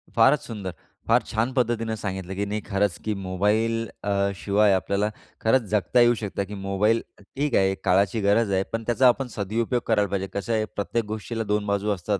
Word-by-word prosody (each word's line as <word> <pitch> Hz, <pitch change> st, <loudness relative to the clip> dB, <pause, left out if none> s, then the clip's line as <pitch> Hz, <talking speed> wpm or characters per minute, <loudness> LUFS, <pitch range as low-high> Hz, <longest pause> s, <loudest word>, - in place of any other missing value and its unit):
फारच 130 Hz, +6 st, +5 dB
सुंदर! 100 Hz, -6 st, -5 dB, 0.3 s
फार -, -, +4 dB
छान 115 Hz, +4 st, 0 dB
पद्धतीनं 115 Hz, -3 st, 0 dB
सांगितलं, 95 Hz, -2 st, -5 dB
की 100 Hz, +1 st, -1 dB
नाही 105 Hz, +1 st, -3 dB
खरंच 100 Hz, -2 st, 0 dB
की 110 Hz, -, 0 dB
मोबाईल 105 Hz, +4 st, 0 dB, 0.2 s
अ, 100 Hz, -1 st, +1 dB
शिवाय 100 Hz, +1 st, +2 dB
आपल्याला 100 Hz, +2 st, 0 dB, 0.3 s
खरंच 120 Hz, +3 st, +3 dB
जगता 105 Hz, +4 st, +2 dB
येऊ 120 Hz, 0 st, +6 dB
शकतं 100 Hz, -1 st, -2 dB
की 105 Hz, -, -9 dB
मोबाईल 100 Hz, +3 st, +1 dB, 0.2 s
ठीक 135 Hz, +6 st, -3 dB
आहे 95 Hz, 0 st, +3 dB
काळाची 100 Hz, +4 st, +2 dB
गरज 100 Hz, +1 st, +2 dB
आहे, 95 Hz, 0 st, +2 dB
पण 115 Hz, 0 st, -2 dB
त्याचा 125 Hz, +2 st, +4 dB
आपण 130 Hz, +2 st, +2 dB
सदुपयोग 115 Hz, +4 st, -1 dB
करायला 105 Hz, -4 st, +2 dB
पाहिजे. 95 Hz, -1 st, -2 dB
कसं 100 Hz, +3 st, -2 dB
आहे 110 Hz, -1 st, +1 dB
प्रत्येक 115 Hz, +3 st, -1 dB
गोष्टीला 110 Hz, +2 st, -4 dB
2 105 Hz, 0 st, +1 dB
बाजू 100 Hz, +1 st, 0 dB
असतात. 100 Hz, +2 st, -2 dB
105 Hz, 185 wpm, -25 LUFS, 100-115 Hz, 0.3 s, येऊ